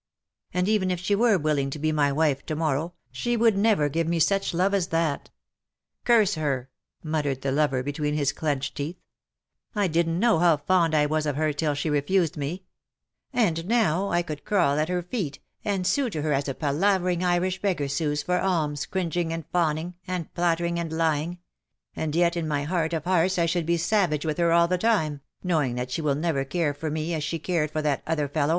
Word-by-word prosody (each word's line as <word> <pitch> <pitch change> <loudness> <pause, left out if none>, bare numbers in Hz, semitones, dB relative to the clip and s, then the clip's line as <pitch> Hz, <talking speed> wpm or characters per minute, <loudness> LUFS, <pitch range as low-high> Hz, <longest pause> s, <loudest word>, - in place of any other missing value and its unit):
And, 180 +1 0
even 205 -3 +2
if 180 -1 -1
she 180 +3 0
were 220 0 +4
willing 150 -4 0
to 135 - -5
be 155 +1 0
my 145 -2 +2
wife 145 -2 +1
to 155 - -2
morrow, 160 +2 -1 0.2
she 240 - -1
would 225 -2 +4
never 200 -7 +3
give 165 +3 -1
me 170 0 +1
such 195 +5 +2
love 185 +3 +1
as 190 -3 +1
that. 165 -4 -1 0.8
Curse 220 -5 +4
her," 135 -6 -2 0.3
muttered 150 -4 -2
the 135 - 0
lover 140 -3 +1
between 150 +2 -2
his 145 -2 +1
clenched 145 -4 -2
teeth; 150 +5 -3 0.5
" - - -66 0.3
I 205 -2 +2
didn^t 165 0 +1
know 225 -2 +3
how 170 -3 +4
fond 165 +1 +2
I 150 -1 +4
was 155 +1 0
of 145 - -1
her 155 0 0
till 145 0 0
she 145 - -2
refused 155 +3 +1
me 155 +6 -4 0.4
— - - -61 0.2
and 180 - 0
now, 200 -5 +2
I 175 0 +1
could 155 -4 -7
crawl 170 -8 +2
at 155 +2 0
her 180 -1 -1
feet, 180 - -3 0.3
and 195 -3 -1
sue 265 +6 +1
to 155 -7 -4
her 155 -1 +1
as 140 +1 0
a 135 - -3
palavering 180 +4 +1
Irish 180 +1 +1
beggar 180 -8 0
sues 150 +1 -1
for 180 +2 +1
alms, 155 -7 0
cringing 175 -2 -1
and 165 -2 -4
fawning, 165 0 0
and 180 -3 -3
flattering 170 0 0
and 165 -2 -3
lying 160 +1 0 0.3
— - - -49
and 155 -1 -2
yet 170 0 +3
in 165 -2 -2
my 145 -2 -1
heart 165 +1 -1
of 160 -2 -1
hearts 185 +1 +2
I 170 - +3
should 170 -1 -1
be 170 0 +2
savage 170 -4 +1
with 155 +1 -2
her 170 -1 +3
all 170 0 +5
the 180 +1 0
time, 160 -10 +1 0.2
knowing 155 -9 +1
that 125 +1 -4
she 160 - -2
will 145 -3 +1
never 150 -2 0
care 145 +2 -1
for 155 +2 -4
me 155 +2 -2
as 155 -2 -2
she 165 - -2
cared 160 -1 -1
for 155 +1 -3
that 145 -3 0
other 150 -3 0
fellow." 145 +1 0
165 Hz, 220 wpm, -25 LUFS, 150-180 Hz, 0.8 s, all